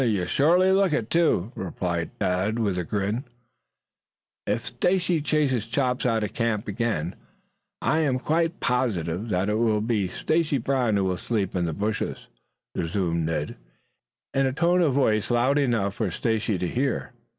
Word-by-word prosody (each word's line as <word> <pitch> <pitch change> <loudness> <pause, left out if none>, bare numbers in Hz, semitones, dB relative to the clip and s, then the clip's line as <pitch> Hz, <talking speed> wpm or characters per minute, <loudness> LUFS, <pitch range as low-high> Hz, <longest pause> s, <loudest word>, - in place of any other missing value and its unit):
"You 105 -8 +1
surely 175 - +4
look 190 -3 +3
it, 115 -7 -1
too," 155 - +2
replied 85 -2 -3
Tad 95 +5 0
with 105 -5 0
a - - -1
grin. 105 +7 -2 1.2
"If - - -1
Stacy 180 - +1
chases 140 -7 +1
Chops 125 +1 0
out 115 -2 +1
of 105 0 -4
camp 115 -3 -1
again 100 -6 -1 0.7
I 155 - +2
am 140 -5 +2
quite 165 +5 0
positive 105 -6 -1
that 95 0 0
it 105 +1 +1
will 110 -2 +2
be 105 -3 0
Stacy 155 - 0
Brown 125 -3 +1
who 100 - +1
will 95 -1 0
sleep 100 -6 -2
in 90 -1 +1
the 80 - -1
bushes," 105 +5 -3 0.5
resumed 85 -1 -1
Ned 75 -2 -3 0.8
in 135 0 +2
a 130 - -1
tone 175 +5 +3
of 155 -6 +3
voice 110 -6 +2
loud 125 +4 +3
enough 115 -8 +1
for 105 -1 -1
Stacy 110 +3 -1
to 90 - -2
hear. 130 +5 -1
115 Hz, 160 wpm, -25 LUFS, 95-135 Hz, 1.2 s, surely